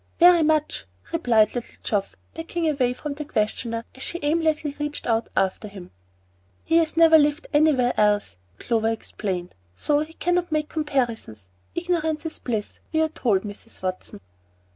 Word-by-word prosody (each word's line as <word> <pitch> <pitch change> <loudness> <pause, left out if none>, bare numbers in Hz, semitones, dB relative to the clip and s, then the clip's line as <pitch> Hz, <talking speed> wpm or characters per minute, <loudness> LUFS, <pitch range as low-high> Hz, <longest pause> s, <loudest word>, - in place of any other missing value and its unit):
"Very 350 -1 +8
much," 310 -1 +1 0.3
replied 230 -10 +3
little 240 -2 -6
Geoff, 200 -2 -1 0.2
backing 330 0 -3
away 270 -5 +2
from 285 +4 -5
the 300 +1 -5
questioner, 230 -2 -2
as 260 - -13
she 345 - -2
aimlessly 305 -1 +1
reached 295 0 -3
out 225 -1 0
after 195 +2 0
him. 195 -3 -11 0.7
"He 330 - +3
has 325 -1 +1
never 325 -1 +8
lived 295 +2 +1
anywhere 290 -5 +4
else," 210 - +2 0.2
Clover 225 - 0
explained; 190 -5 -4 0.2
"so 290 - +1
he 310 +2 -4
cannot 355 0 0
make 305 -1 0
comparisons. 235 - -2 0.3
Ignorance 330 -3 -1
is 320 - -4
bliss, 220 -4 -4
we 315 - +1
are 320 0 +2
told, 215 -10 +1
Mrs. 205 0 -9
Watson." 185 - -5
290 Hz, 155 wpm, -24 LUFS, 220-315 Hz, 0.7 s, Very